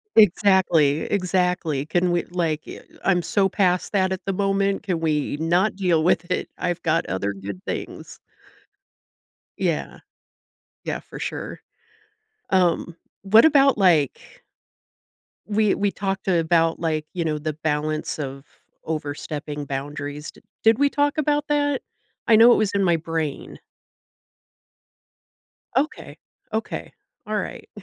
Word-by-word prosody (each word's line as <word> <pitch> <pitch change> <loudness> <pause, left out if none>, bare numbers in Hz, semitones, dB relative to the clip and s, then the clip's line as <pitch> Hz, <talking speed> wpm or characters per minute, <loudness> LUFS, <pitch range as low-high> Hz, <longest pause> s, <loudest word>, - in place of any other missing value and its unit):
Exactly, 180 -7 +4
exactly. 180 -6 0
Can 175 +3 +1
we, 175 0 +1
like, 165 -4 -1
y - - -9 0.2
I'm 180 -2 +3
so 195 +2 +1
past 180 -2 +1
that 190 -2 +1
at 190 - -4
the 195 - -1
moment. 195 0 0
Can 185 -5 -1
we 150 -3 -1
not 175 +6 +1
deal 180 -5 +2
with 175 0 +1
it? - - -1
I've 175 -1 -2
got 165 +1 +1
other 95 +3 -2
good 100 - -7
things. - - -6 1.4
Yeah. - - -2 0.8
Yeah, - - -3
for - - -11
sure. - - -5 0.9
Um, 175 -2 +1 0.3
what 210 +4 +6
about 275 -5 +5
like 165 -8 +1 1.0
We 210 -1 +2
we 200 0 0
talked 195 -1 -3
about, 165 -2 +2
like, 155 -2 -1
you 175 -2 -2
know, 155 -1 0
the 155 +1 -3
balance 155 0 -2
of 135 -1 -5 0.4
overstepping 150 -1 -4
boundaries. 145 +2 -5
Did - - -21 0.2
did 225 +2 +5
we 285 0 +4
talk 290 +1 0
about 295 0 +1
that? 290 -2 +1 0.5
I 230 - +6
know 230 +2 +8
it - - +3
was 215 -2 +1
in 200 -1 +2
my 170 -3 +3
brain. 160 -3 -4 2.2
Okay, 295 +4 -2 0.4
okay, 220 +1 -4 0.4
all 215 - -2
right, - - -6
175 Hz, 130 wpm, -23 LUFS, 155-200 Hz, 2.2 s, know